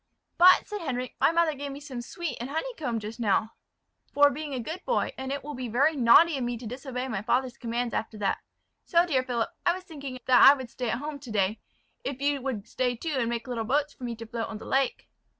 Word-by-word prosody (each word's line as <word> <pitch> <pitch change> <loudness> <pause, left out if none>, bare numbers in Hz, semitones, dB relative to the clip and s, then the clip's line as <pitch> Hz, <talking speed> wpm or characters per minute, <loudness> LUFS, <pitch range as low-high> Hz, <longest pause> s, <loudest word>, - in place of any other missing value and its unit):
"But," 365 +1 +7
said 415 -2 -5
Henric, 255 -5 -3
"my - - +5
mother 335 -1 +2
gave 285 0 -6
me 275 - -7
some 270 -4 -6
sweet 340 +6 -5
and 245 - -4
honeycomb 310 - -3
just 215 +3 -7
now, 220 0 +1 0.6
for 285 0 +5
being 300 +2 -5
a - - -2
good 320 +10 -6
boy; - - 0
and 265 0 -5
it 280 0 -3
will 295 +1 -6
be 255 -2 -4
very 280 +8 +2
naughty 280 +5 +6
of - - -2
me 240 0 -2
to 235 - -10
disobey 255 +2 -5
my 220 -6 -3
father's 250 +2 0
commands 235 0 -3
after 220 0 -3
that. 200 -2 0 0.4
So, 340 0 +3
dear 275 -7 +2
Philip, 245 -3 -2
I 345 - +3
was 370 - -8
thinking 280 -7 -7
that 250 -2 +6
I 275 - +10
would 260 -4 -8
stay 245 -2 -3
at 235 - 0
home 295 +2 -5
to 275 -3 -11
day, 210 0 0 0.4
if 275 - -4
you 285 0 0
would 245 -6 -4
stay 250 -1 -1
too, 310 +6 -4
and 235 -2 0
make 235 0 -3
little 240 -3 -2
boats 285 +5 0
for - - -14
me 240 -1 -3
to 230 0 -8
float 225 0 -4
on 225 - -6
the - - -10
lake." 270 -1 0
255 Hz, 245 wpm, -27 LUFS, 235-290 Hz, 0.6 s, I